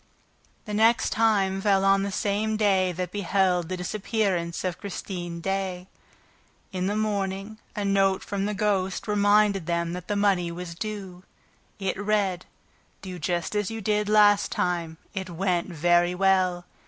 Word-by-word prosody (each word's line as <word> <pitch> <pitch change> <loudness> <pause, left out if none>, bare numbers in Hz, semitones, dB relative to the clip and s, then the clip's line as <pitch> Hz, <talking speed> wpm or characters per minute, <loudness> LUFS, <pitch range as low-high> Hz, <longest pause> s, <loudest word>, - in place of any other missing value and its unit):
The 210 - -5
next 225 +3 +3
time 200 -4 +2
fell 195 -1 +3
on 195 0 +4
the 200 0 -2
same 210 +3 0
day 190 -3 +2
that 180 0 -4
beheld 185 -3 +1
the 185 - -3
disappearance 185 -3 -1
of 180 -2 -3
Christine 175 -3 -5
Daae. 190 -1 -2 0.8
In 185 -1 -2
the 205 - -1
morning, 205 0 -2 0.2
a 205 -2 -2
note 195 -1 +2
from 200 -1 -2
the 210 - -2
ghost 195 -2 0
reminded 205 -3 +3
them 170 0 -1
that 180 -1 -7
the 205 - -1
money 195 -4 +2
was 170 0 -6
due. 190 -1 -6 0.6
It 195 -2 -2
read: 205 -4 0 0.6
Do 185 -2 -7
just 175 +4 -2
as 210 -2 0
you 225 0 -5
did 210 0 0
last 205 -1 +5
time. 170 -2 -1 0.2
It 190 -1 -4
went 175 0 -1
very 175 +1 +2
well. 185 -2 +2
195 Hz, 155 wpm, -26 LUFS, 180-205 Hz, 0.8 s, last